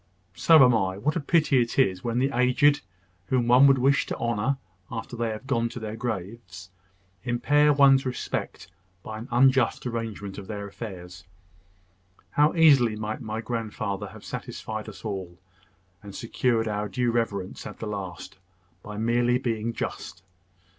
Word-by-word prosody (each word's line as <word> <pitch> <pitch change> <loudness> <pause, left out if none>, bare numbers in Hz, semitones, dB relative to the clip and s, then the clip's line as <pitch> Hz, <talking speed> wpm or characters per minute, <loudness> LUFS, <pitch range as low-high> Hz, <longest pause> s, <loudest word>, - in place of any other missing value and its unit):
"So 155 +5 +6
am 125 - +4
I. 95 -4 0
What 150 - -1
a - - +1
pity 150 -3 +3
it 115 -1 -3
is, 95 -9 +2
when 120 0 -2
the 135 +2 +1
aged, 125 +4 +3 0.5
whom 125 0 +1
one 125 +3 +7
would 135 -1 +5
wish 135 +2 +2
to - - -4
honour 120 +3 -1 0.3
after 115 +2 -6
they 115 -1 -1
are 110 - -4
gone 115 -1 -1
to 125 - -7
their 110 -1 -5
graves, 95 -4 -6 0.5
impair 145 +5 +3
one's 135 -2 +5
respect, 125 -8 -4 0.4
by 110 0 -7
an 115 - -8
unjust 130 +2 +3
arrangement 110 -4 -5
of 95 - -10
their 100 -1 -5
affairs! 90 -5 -9 1.1
How 150 +3 +3
easily 140 -9 +5
might 110 +2 -4
my 110 -1 -4
grandfather 110 -4 -4
have - - -13
satisfied 110 -1 -6
us - - -12
all, 95 -4 -5 0.6
and 100 -2 -11
secured 115 0 0
our 105 -1 -2
due 125 -2 0
reverence 100 -5 -2
at - - -9
the - - -6
last, 95 -3 -6 0.4
by 105 +1 -8
merely 120 +2 +2
being 115 -2 -2
just! 95 -4 -6
115 Hz, 160 wpm, -26 LUFS, 105-125 Hz, 1.1 s, one